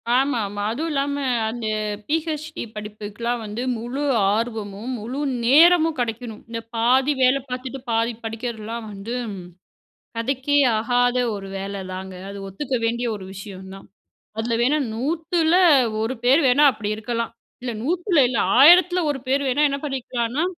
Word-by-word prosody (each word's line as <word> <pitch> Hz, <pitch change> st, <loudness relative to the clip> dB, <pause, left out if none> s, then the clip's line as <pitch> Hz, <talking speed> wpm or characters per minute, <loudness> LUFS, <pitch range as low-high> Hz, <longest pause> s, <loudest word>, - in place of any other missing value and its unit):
ஆமாமா, 225 Hz, -7 st, 0 dB
அதும் 320 Hz, +7 st, -3 dB
இல்லாம 280 Hz, 0 st, 0 dB, 0.3 s
அந்த 230 Hz, -1 st, -4 dB, 0.4 s
பி.எச்.டி 310 Hz, 0 st, -2 dB
படிப்புக்கெல்லாம் 210 Hz, +3 st, -4 dB
வந்து 210 Hz, +3 st, -5 dB, 0.2 s
முழு 245 Hz, +5 st, -4 dB, 0.3 s
ஆர்வமும், 220 Hz, 0 st, -3 dB
முழு 245 Hz, +6 st, -5 dB, 0.3 s
நேரமும் 325 Hz, +4 st, +6 dB
கெடைக்கணும். 230 Hz, -1 st, -4 dB
இந்த 230 Hz, 0 st, -4 dB, 0.2 s
பாதி 255 Hz, +5 st, +3 dB
வேலை 255 Hz, +2 st, +4 dB
பார்த்துட்டு 255 Hz, +1 st, -5 dB
பாதி 230 Hz, +1 st, +1 dB
படிக்கிறதுலாம் 225 Hz, 0 st, -5 dB
வந்து, 205 Hz, +5 st, -6 dB, 1.0 s
கதைக்கே 265 Hz, +4 st, 0 dB, 0.2 s
ஆகாத 245 Hz, +2 st, +2 dB, 0.2 s
ஒரு 195 Hz, -1 st, -7 dB
வேல 195 Hz, 0 st, -5 dB
தாங்க. 190 Hz, 0 st, -7 dB, 0.2 s
அது 200 Hz, -, -7 dB
ஒத்துக்க 255 Hz, +8 st, -3 dB
வேண்டிய 235 Hz, +1 st, -1 dB
ஒரு 190 Hz, -2 st, -8 dB
விஷயம் 195 Hz, -1 st, -9 dB
தான். 195 Hz, -, -13 dB, 0.5 s
அதில 230 Hz, +1 st, -1 dB
வேணா 285 Hz, +5 st, +3 dB, 0.2 s
100த்துல 320 Hz, -, 0 dB, 0.5 s
ஒரு 225 Hz, +4 st, -1 dB
பேர் 270 Hz, +6 st, +5 dB
வேணா 270 Hz, +4 st, +5 dB
அப்டிருக்கலாம். 220 Hz, +1 st, -3 dB, 0.3 s
இல்ல 250 Hz, -, -3 dB
100த்துல 350 Hz, +1 st, +1 dB
இல்ல 235 Hz, -4 st, -1 dB, 0.2 s
1000த்துல 355 Hz, +5 st, +7 dB
ஒரு 270 Hz, -, -5 dB
பேர் 275 Hz, +2 st, +2 dB
வேணா 270 Hz, +4 st, +1 dB
என்ன 280 Hz, -, -2 dB
பண்ணிக்கலான்னா, 255 Hz, 0 st, -2 dB
245 Hz, 135 wpm, -22 LUFS, 220-280 Hz, 1.0 s, 1000த்துல